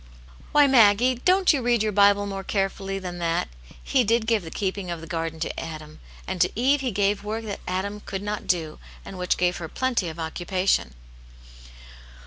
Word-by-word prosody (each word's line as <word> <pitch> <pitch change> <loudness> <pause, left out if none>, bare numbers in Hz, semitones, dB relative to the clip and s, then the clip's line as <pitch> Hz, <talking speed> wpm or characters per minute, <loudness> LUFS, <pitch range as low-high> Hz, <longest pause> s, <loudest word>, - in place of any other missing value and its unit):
" 60 -1 -22
Why, 295 -1 +6
Maggie! 240 -1 +5
don't 370 -1 +5
you 280 - 0
read 240 -2 +2
your 215 - 0
Bible 205 0 +4
more 195 -1 -5
carefully 195 0 -2
than 180 -2 -6
that? 165 - -1 0.3
He 260 -2 +2
did 230 +1 +1
give 225 -2 +2
the 165 - -8
keeping 190 0 -3
of 170 -1 -4
the 165 - -9
garden 165 -1 -4
to - - -3
Adam, 155 -1 -8 0.3
and 185 -2 -3
to - - +4
Eve 270 +3 +3
he 260 - -1
gave 200 0 0
work 220 +2 -4
that 205 -2 -5
Adam 195 +3 -3
could 195 -1 -6
not 210 0 -4
do, 160 -4 -1 0.3
and 190 - -8
which 180 0 0
gave 180 0 +1
her 165 -2 -6
plenty 245 -7 -1
of 160 - -9
occupation." 175 - -1
195 Hz, 195 wpm, -25 LUFS, 175-220 Hz, 0.3 s, Why